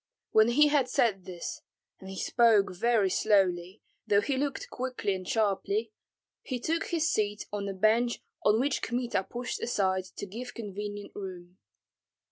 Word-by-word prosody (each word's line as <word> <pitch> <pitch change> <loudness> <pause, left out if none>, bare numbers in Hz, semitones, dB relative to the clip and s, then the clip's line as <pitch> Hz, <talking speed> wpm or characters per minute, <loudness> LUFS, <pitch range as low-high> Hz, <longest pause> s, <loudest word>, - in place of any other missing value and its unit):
When 220 0 +6
he 295 +5 +5
had 280 -4 +2
said 200 -7 +1
this, 175 -2 -6 0.4
and 190 - -10
he 190 - -7
spoke 220 -5 +3
very 215 -1 +2
slowly, 185 -2 +1 0.2
though 205 -1 +4
he 275 +5 -1
looked 280 +1 -3
quickly 250 -5 -2
and 185 -1 -6
sharply, 225 - 0 0.5
he 255 -2 -4
took 325 +7 -1
his 330 -1 +1
seat 210 -1 -1
on 200 -1 -2
the 195 - -3
bench 225 +5 +2 0.2
on 210 +1 +4
which 275 +2 0
Kmita 240 -5 -1
pushed 245 0 -5
aside 190 -5 0
to - - -5
give 235 +6 -7
convenient 205 -2 -6
room. 185 -2 -8
215 Hz, 155 wpm, -29 LUFS, 195-245 Hz, 0.5 s, When